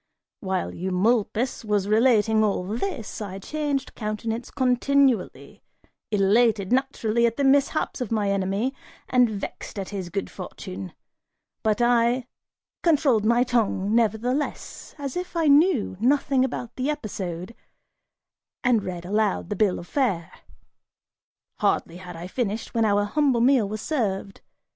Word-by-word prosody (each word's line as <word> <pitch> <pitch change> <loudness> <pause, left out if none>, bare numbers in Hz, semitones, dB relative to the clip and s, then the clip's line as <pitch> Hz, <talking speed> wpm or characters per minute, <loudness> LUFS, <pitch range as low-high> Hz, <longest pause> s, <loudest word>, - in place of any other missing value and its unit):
While 190 -2 -2
Eumolpus 215 +7 0
was 205 -2 0
relating 220 -1 +4
all 200 -3 0
this, 225 - -4
I 195 -2 -5
changed 285 +4 -3
countenance 225 +2 -4
continually, 260 -3 +1 0.5
elated, 210 +1 +3
naturally, 235 -3 +1
at 230 - -3
the 280 - 0
mishaps 280 +1 +2
of 240 - -3
my 210 -3 +1
enemy, 200 +6 0 0.4
and 250 -2 +4
vexed 205 0 -6
at 195 -2 -4
his 190 -4 -5
good 195 +3 -4
fortune; 95 -1 -8 0.7
but 220 +2 +1
I 240 +1 +3 0.6
controlled 280 -10 +3
my 235 +2 +4
tongue 220 -5 0
nevertheless, 235 +5 -1
as 280 -3 -5
if 360 0 -5
I 330 - +2
knew 290 - +4
nothing 270 +2 +2
about 245 -2 -4
the 260 +3 -1
episode, 190 - -4 1.1
and 245 -4 +3
read 175 -2 -5
aloud 205 -2 0
the - - 0
bill 200 -2 +2
of - - -8
fare. 190 - -1 1.3
(Hardly 170 - 0
had 180 -1 -9
I 165 +1 -7
finished, 220 +2 -3
when 230 -2 +2
our 205 -1 +3
humble 265 +1 +2
meal 245 -5 +4
was 215 0 -4
served. 200 -9 -2
225 Hz, 135 wpm, -25 LUFS, 200-255 Hz, 1.3 s, relating